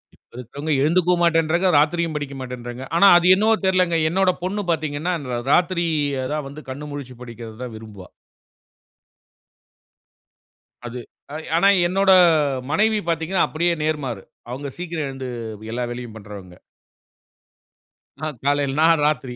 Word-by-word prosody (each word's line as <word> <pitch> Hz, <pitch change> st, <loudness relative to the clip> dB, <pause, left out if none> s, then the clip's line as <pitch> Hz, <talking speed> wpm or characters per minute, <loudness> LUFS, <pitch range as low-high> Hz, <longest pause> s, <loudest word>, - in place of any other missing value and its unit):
இப்போ -, -, -24 dB
இருக்குறவங்க 140 Hz, +6 st, -6 dB
எழுந்துக்கவும் 175 Hz, +3 st, +2 dB
மாட்டேன்றாங்க, 170 Hz, +2 st, +2 dB
ராத்திரியும் 160 Hz, +2 st, +1 dB
படிக்க 145 Hz, -2 st, -4 dB
மாட்டேன்றாங்க. 125 Hz, -1 st, -7 dB
ஆனா, 200 Hz, +4 st, +6 dB
அது 175 Hz, +1 st, +2 dB
என்னவோ 215 Hz, +3 st, +3 dB
தெரியலங்க, 185 Hz, -3 st, +2 dB
என்னோட 190 Hz, +2 st, +2 dB
பொண்ணு 200 Hz, +3 st, -2 dB
பார்த்தீங்கணா, 155 Hz, +2 st, -2 dB, 0.2 s
ர 120 Hz, -, -1 dB
ராத்திரி 175 Hz, 0 st, +2 dB, 0.5 s
தான் 150 Hz, -2 st, -3 dB
வந்து 145 Hz, +2 st, -10 dB
கண் 150 Hz, +3 st, -7 dB
முழிச்சு 140 Hz, -3 st, -8 dB
படிக்கிறது 115 Hz, -2 st, -9 dB
தான் 125 Hz, -, -7 dB
விரும்புவா. 105 Hz, -4 st, -11 dB, 2.8 s
அது 125 Hz, +1 st, -7 dB, 0.6 s
ஆனா, 170 Hz, +4 st, +4 dB, 0.2 s
என்னோட 195 Hz, +2 st, +2 dB, 0.6 s
மனைவி 215 Hz, +6 st, +2 dB
பார்த்தீங்கனா 165 Hz, +3 st, 0 dB
அப்படியே 170 Hz, +2 st, 0 dB
நேர்மாறு. 150 Hz, -10 st, -3 dB, 0.3 s
அவுங்க 140 Hz, +3 st, -5 dB
சீக்கிரம் 170 Hz, -4 st, -4 dB
எழுந்து, 135 Hz, -1 st, -6 dB, 0.4 s
எல்லா 125 Hz, +2 st, -2 dB
வேலையும் 120 Hz, -2 st, -7 dB
பண்ணுறவங்க. 100 Hz, -4 st, -11 dB, 1.7 s
அ -, -, 0 dB, 0.2 s
காலையில 145 Hz, -1 st, +1 dB
நான் 165 Hz, -1 st, +4 dB
ராத்திரி. 130 Hz, -4 st, -1 dB
150 Hz, 125 wpm, -21 LUFS, 125-175 Hz, 2.8 s, ஆனா